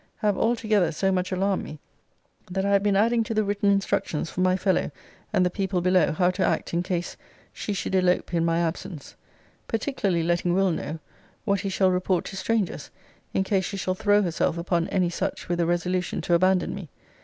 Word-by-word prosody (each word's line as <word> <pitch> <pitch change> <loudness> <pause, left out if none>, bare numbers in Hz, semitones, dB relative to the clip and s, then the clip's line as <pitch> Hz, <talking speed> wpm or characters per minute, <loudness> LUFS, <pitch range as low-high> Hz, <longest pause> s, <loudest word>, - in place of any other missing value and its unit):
have, 210 -2 0
all 230 +5 +2
together, 215 -6 +1
so 190 +5 0
much 185 0 -1
alarmed 190 +1 0
me, 150 - -9 0.7
that 190 +1 -1
I 200 - +1
have 200 -1 +4
been 205 -1 +2
adding 230 +3 +3
to 225 - -3
the 215 - +3
written 205 0 0
instructions 195 -5 0
for 185 - -3
my 185 0 +3
fellow 190 0 +1 0.4
and 180 - +3
the 180 - +1
people 190 -1 -1
below 180 -2 +3
how 180 +3 +2
to - - -1
act - - 0
in 170 - +1
case 175 -1 -3 0.4
she - - -4
should 190 - -3
elope 180 -1 +2
in 165 -1 +2
my 165 0 +1
absence: 165 -2 -4 0.5
particularly 205 - -1
letting 175 +1 +1
Will. 195 -1 +3
know 160 -1 -4 0.5
what 200 -1 +1
he 195 - -3
shall 190 -1 +2
report 180 -1 0
to 195 - -7
strangers 195 -6 -1 0.5
in 190 - +3
case 190 -1 0
she 200 - -4
shall 185 -1 -1
throw 205 +2 +3
herself 170 -1 0
upon 170 0 0
any 180 -3 +1
such - - -3
with 175 0 -1
a 170 - +2
resolution 180 +1 -1
to 175 - 0
abandon 180 +1 +3
me. 190 -6 -7
185 Hz, 205 wpm, -25 LUFS, 175-200 Hz, 0.7 s, have